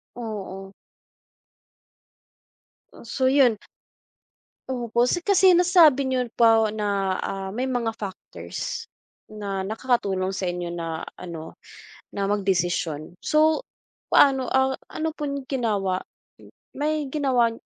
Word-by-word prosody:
Oo. 195 -4 -6 2.2
Oh, - - -14
so 260 +3 -1
'yun. 260 -5 +4 1.1
Opo 240 -1 0
si 350 +6 -1
kasi 380 -3 +5
nasabi 335 -6 +5
niyo 255 -2 0
po 225 -2 +5
na, 200 -3 -1
ah, 195 0 -4
may 235 +6 -3
mga 245 -3 -1
factors 195 -3 -6 0.5
na 200 -2 -4
nakakatulong 205 -4 0
sa 190 0 -3
inyo 175 -1 -2
na 165 -2 -4 0.2
ano 165 -3 -8 0.6
na 200 -1 -2
magdesisyon. 175 -5 -1
So 315 +8 +3 0.5
paano, 265 -2 +5
ah, 265 0 +2 0.2
ano 320 - -2
pong 280 -3 -4
ginawa, 205 -8 -1 0.7
may 300 0 -1
ginawa 260 -5 +2
225 Hz, 105 wpm, -24 LUFS, 195-265 Hz, 2.2 s, kasi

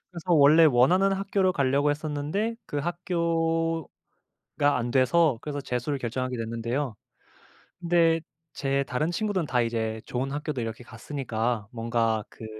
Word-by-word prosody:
그래서 175 0 -3
원래 155 +2 +7
원하는 165 +9 +4
학교를 195 -1 +1
가려고 140 0 +2
했었는데 155 +9 -2
그 145 - -3
학교가 165 -1 -1 0.7
안 120 -1 -2
돼서 130 +2 +3
그래서 145 -1 -4
재수를 130 +2 -2
결정하게 130 +1 -3
됐는데요. 115 +3 -3 0.9
근데 170 -2 +3 0.3
제 140 0 0
다른 125 +5 -1
친구들은 195 -2 -1
다 125 -2 +1
이제 110 -1 -2
좋은 130 +2 -3
학교도 145 -2 -3
이렇게 115 +1 -5
갔으니까 115 -3 -3
뭔가 115 -2 0
그 110 - -11
140 Hz, 315 characters per minute, -26 LUFS, 120-165 Hz, 0.9 s, 원래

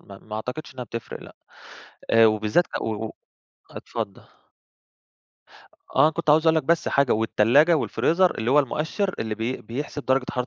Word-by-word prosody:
ما 100 -1 -13
ما 110 +1 -8
أعتقدش 125 +6 -6
إنّها 125 -1 -6
بتفرق 115 +1 -7
لأ. - - -14 0.7
آآ 115 0 +6
وبالذات 110 +9 +2 0.2
و 110 0 -3
و - - -6 0.6
اتفضّل. - - -6 1.8
آه. 155 - +6
كنت 160 -2 -1
عاوز 155 +2 +4
أقول 160 - +4
لك 160 - +1
بس 170 +2 +1
حاجة، 140 -3 +2
والتلاجة 115 +9 +3
والفريزر 175 +4 +1
اللي 115 +3 -1
هو 145 - +5
المؤشِّر 160 - -1
اللي 110 -1 -3
بي 115 +4 -3
بيحسب 145 +5 -6
درجة 130 0 +1
حرارة 125 -1 -3
130 Hz, 160 wpm, -24 LUFS, 110-155 Hz, 1.8 s, آآ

